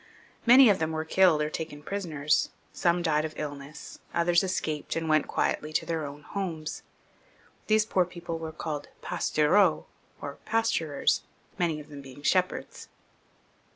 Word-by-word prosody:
Many 255 +2 +9
of 200 -3 +4
them 160 0 -1
were 160 0 -2
killed 165 -3 +4
or 150 - -3
taken 155 -3 -6
prisoners; 155 -6 0 0.2
some 175 0 +1
died 155 -2 +2
of 155 0 -5
illness, 145 0 -7 0.2
others 170 +1 +3
escaped, 160 -5 -2
and 165 -1 -2
went 155 -1 +3
quietly 155 - -1
to - - 0
their 160 -3 -2
own 145 +1 -10
homes. 170 -6 -4 0.9
These 215 0 +4
poor 185 -4 +2
people 170 -1 -6
were 160 -1 -5
called 155 -2 -5 0.2
pastoureaux, 160 +3 +2 0.3
or 140 -1 -7
pasturers, 215 -10 +1 0.4
many 165 -3 +1
of 150 - -12
them 145 -1 -9
being 135 +1 -12
shepherds. 185 +2 0
160 Hz, 150 wpm, -28 LUFS, 150-180 Hz, 0.9 s, Many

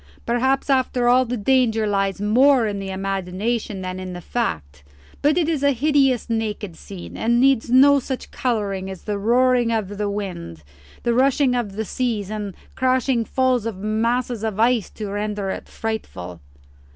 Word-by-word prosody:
"Perhaps 260 +3 +1
after 260 -3 +1
all 255 +1 +5
the 245 +1 -3
danger 225 -1 +2
lies 195 -2 0
more 245 +5 +4
in 205 -2 -2
the 195 0 -5
imagination 195 +2 -2
than 185 0 -5
in 185 -1 -6
the 175 - -6
fact. 75 - -3 0.4
But 295 +3 +3
it 335 -3 +2
is 320 -4 0
a 285 0 +3
hideous 270 -2 +2
naked 215 -5 -3
scene, 185 +1 -10
and 235 +1 +1
needs 265 -3 +3
no 280 +3 +6
such 265 0 -6
colouring 200 -6 -2
as 190 -2 -8
the 205 -1 -3
roaring 245 +2 +3
of 215 -4 -1
wind, 190 - -4 0.4
the 235 - +1
rushing 265 +1 +3
of 230 -5 -2
seas, 215 -4 -2
and 210 -2 -4
the - - -27 0.2
crashing 255 -2 +1
falls 255 -3 +1
of 220 -4 -4
masses 230 +3 -1
of 215 -2 -2
ice 230 -3 +2
to 215 - -6
render 205 -1 -2
it - - -6
frightful." 90 - -5
225 Hz, 165 wpm, -22 LUFS, 200-255 Hz, 0.4 s, no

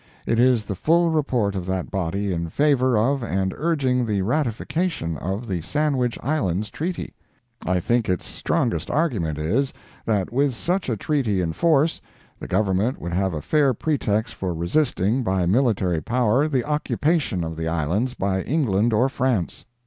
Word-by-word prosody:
It 115 - +1
is 120 -3 +4
the 100 - -3
full 165 - +2
report 125 -10 +1
of 95 -2 -4
that 95 -1 -2
body 95 +2 -1
in 85 -1 -3
favor 130 - +2
of 135 +6 +2
and 95 -4 -1
urging 135 -6 +1
the 105 -4 0
ratification 125 - -1
of 95 - -4
the 90 -5 -2
Sandwich 125 - 0
Islands 105 - -1
treaty. 170 +3 -4 0.5
I 90 0 +2
think 120 +4 0
its 90 -2 -1
strongest - - -1
argument 115 - 0
is, 110 - 0 0.4
that 105 -2 0
with 135 0 +2
such 180 +5 -1
a 115 - -1
treaty 120 -6 0
in 85 -3 -1
force, 160 - +2 0.4
the - - -7
Government 100 +5 +1
would 85 0 -5
have 95 -1 0
a 75 - -5
fair 145 -5 +2
pretext 110 -6 -1
for 90 -3 -3
resisting 110 - +1
by 95 -5 0
military 95 -5 +2
power, 125 - +2
the 135 -5 0
occupation 150 - 0
of 80 0 -4
the 80 0 -3
Islands 85 - -1
by 95 -1 0
England 115 - +1
or 120 +5 +3
France. 125 -9 -1
115 Hz, 165 wpm, -23 LUFS, 95-140 Hz, 0.5 s, is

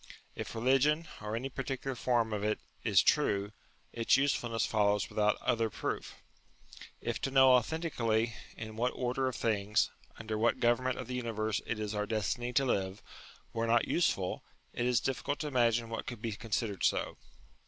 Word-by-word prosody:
If 110 0 -6
religion, 135 +7 +3
or 105 +1 -3
any 125 +4 -2
particular 135 0 -3
form 115 -2 +1
of 105 -1 -2
it, 105 0 0 0.2
is - - +4
true, 100 +1 +2 0.4
its 115 +2 +3
usefulness 120 -5 +1
follows 105 -2 +2
without 105 0 +1
other 115 -1 +1
proof. - - -4 0.9
If - - -3
to - - 0
know 130 -1 +6
authentically 120 -4 +1 0.2
in 110 -1 -7
what 125 +2 +1
order 130 +1 0
of 130 - -2
things, 105 -2 +1 0.3
under 110 -1 -4
what 115 +2 +2
government 125 +2 +2
of 125 - -5
the 125 - -6
universe 110 -3 -1
it 120 - -1
is 105 -1 -3
our 105 0 -1
destiny 115 +3 -1
to 135 +3 +3
live, 95 -5 -1 0.5
were 115 0 -1
not 115 0 +3
useful, 95 - 0 0.3
it 120 - -1
is 125 -1 +3
difficult 135 +2 -2
to 150 - -2
imagine 120 -4 +2
what 115 +2 -5
could 120 -4 -5
be 115 0 -3
considered 105 -2 -3
so. - - +1
115 Hz, 170 wpm, -32 LUFS, 110-125 Hz, 0.9 s, know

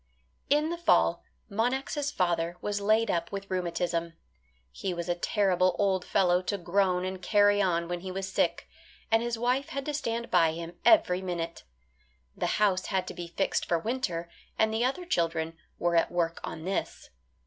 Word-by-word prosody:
In 300 +3 +3
the 340 - -4
fall 345 - +3 0.2
Monax' 265 +7 -1
father 175 - 0
was 205 +1 -2
laid 215 +1 +3
up 170 +5 -2
with 195 -1 -6
rheumatism. 170 -2 -1 0.6
He 185 - -4
was 170 0 -4
a 175 - +2
terrible 185 0 +2
old 190 -3 +1
fellow 180 -1 +3
to 200 +2 -2
groan 180 0 +1
and 185 0 -5
carry 205 +1 +4
on 170 -3 +1
when 175 0 -3
he 185 +1 -6
was 190 +1 -3
sick, 190 - 0 0.4
and 225 0 +4
his 235 -1 -2
wife 250 +4 0
had 275 0 -4
to 300 - -2
stand 235 -5 -3
by 165 -3 +4
him 165 +1 -6
every 185 - +5
minute. 170 -2 -4 0.7
The - - -1
house 195 -3 +2
had 190 -2 0
to - - -6
be 175 -1 -6
fixed 175 +3 -1
for 170 - +2
winter, 180 -5 -2 0.3
and 220 0 +2
the 225 +2 +1
other 275 +8 -1
children 165 - -1 0.2
were 175 0 +1
at 165 - +3
work 170 -1 0
on 160 - -6
this. 190 +1 -3
190 Hz, 180 wpm, -29 LUFS, 175-225 Hz, 0.7 s, every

